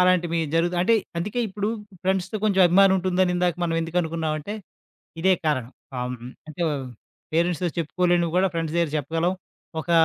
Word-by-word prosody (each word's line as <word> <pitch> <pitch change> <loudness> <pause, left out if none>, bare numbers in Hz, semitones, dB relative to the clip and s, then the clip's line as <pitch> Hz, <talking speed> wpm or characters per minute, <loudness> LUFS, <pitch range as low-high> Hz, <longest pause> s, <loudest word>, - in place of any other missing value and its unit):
అలాంటివి 175 -2 +3 0.2
జరుగుతా 175 +2 +2
అంటే 230 +5 +4 0.2
అందుకే 205 +7 -3
ఇప్పుడు 205 +2 -2 0.3
ఫ్రెండ్స్‌తో 190 +2 0
కొంచెం 200 -3 +3
అభిమానం 190 +2 +6
ఉంటుందని 185 0 +2
ఇందాక 175 -2 +2
మనం 165 -1 0
ఎందుకు 165 +2 -4
అనుకున్నామంటే 160 +2 -2 0.7
ఇదే 190 +2 +5
కారణం. 130 -5 0 0.3
ఆహ్, 125 0 -2
హ్మ్, 120 +2 -8 0.2
అంటే 155 +3 -9 0.7
పేరెంట్స్‌తో 175 +1 +1
చెప్పుకోలేనివి 175 +1 +1
గూడా 190 +1 +4
ఫ్రెండ్స్ 165 -1 -2
దగ్గర 170 -3 +2
చెప్పగలం. 165 +5 0 0.5
ఒక 170 - -6
175 Hz, 150 wpm, -24 LUFS, 165-185 Hz, 0.7 s, అభిమానం